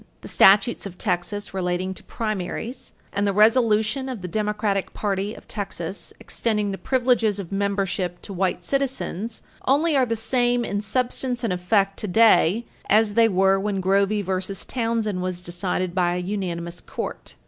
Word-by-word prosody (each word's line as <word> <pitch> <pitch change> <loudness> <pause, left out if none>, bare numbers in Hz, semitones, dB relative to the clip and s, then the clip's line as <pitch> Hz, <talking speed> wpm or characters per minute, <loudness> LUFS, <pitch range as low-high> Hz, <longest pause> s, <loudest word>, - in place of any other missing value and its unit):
The - - -9
statutes 200 +2 +5
of 180 -2 -11
Texas 195 +2 -2
relating 185 0 -1
to - - -12
primaries 225 +4 -4 0.2
and 200 +1 +1
the - - +2
resolution 220 +3 +3
of 235 -8 -6
the - - -3
Democratic 210 0 -1
party 200 +1 -2
of - - -14
Texas 195 -3 -4
extending 210 -3 -1
the 195 - -5
privileges 240 -5 +2
of 195 -3 -6
membership 195 -3 -1
to 200 - -7
white 180 -1 -1
citizens 235 -4 -2 0.2
only 300 +4 +3
are 260 -2 +3
the 230 - 0
same 245 +1 +1
in 205 0 -2
substance 245 +3 -1
and 225 - +1
effect 195 +2 +1
today 220 0 +4 0.2
as 215 0 +4
they 230 +1 +5
were 195 0 +3
when 200 0 -1
Grovey 200 +2 +2
v. 190 +1 -2
Townsend 225 -5 -1
was 185 -1 -3
decided 180 0 -2
by 175 -1 +1
a - - -1
unanimous 180 -3 -4
Court. - - -6
205 Hz, 160 wpm, -24 LUFS, 185-230 Hz, 0.2 s, statutes